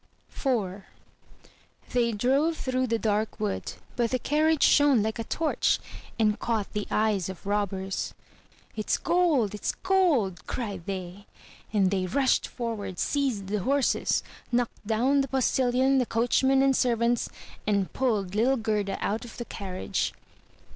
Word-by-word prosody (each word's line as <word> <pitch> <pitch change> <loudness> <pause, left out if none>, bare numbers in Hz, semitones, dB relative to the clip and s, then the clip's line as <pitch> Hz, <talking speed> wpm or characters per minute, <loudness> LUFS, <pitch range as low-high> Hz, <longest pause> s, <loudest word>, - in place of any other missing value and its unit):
IV 205 -8 -1 1.1
They 240 -2 +2
drove 275 +9 +1
through 255 0 -1
the 230 -1 +1
dark 215 0 -1
wood; 210 -2 -2 0.2
but 235 -1 +1
the 255 - +1
carriage 305 +3 +2
shone 285 -7 +5
like 220 +2 -2
a - - -1
torch, 315 +7 +1 0.4
and 215 -1 +2
caught 220 -4 -2
the 210 -1 -2
eyes 210 -4 +1
of 190 -1 -9
robbers. 195 -2 -2 0.6
"It's 215 -1 0
gold! 315 - +2
It's 210 - -2
gold!'' 325 - +1
cried 200 -8 -4
they; 190 0 -6 0.4
and 195 -3 +2
they 190 -2 0
rushed 265 +8 +2
forward, 215 -6 -5
seized 265 -9 0
the 205 +2 -1
horses, 270 +6 +1 0.3
knocked 240 -3 -1
down 255 +6 +3
the 275 - -2
postilion, 260 0 +2
the 250 - 0
coachman, 265 +3 +3
and 270 -1 +4
servants, 235 -1 +1 0.4
and 200 -3 +1
pulled 210 -8 0
little 245 +6 +3
Gerda 210 -3 -1
out 215 +3 -1
of 240 - -11
the 240 - -5
carriage. 190 -4 -3
230 Hz, 140 wpm, -27 LUFS, 205-265 Hz, 1.1 s, shone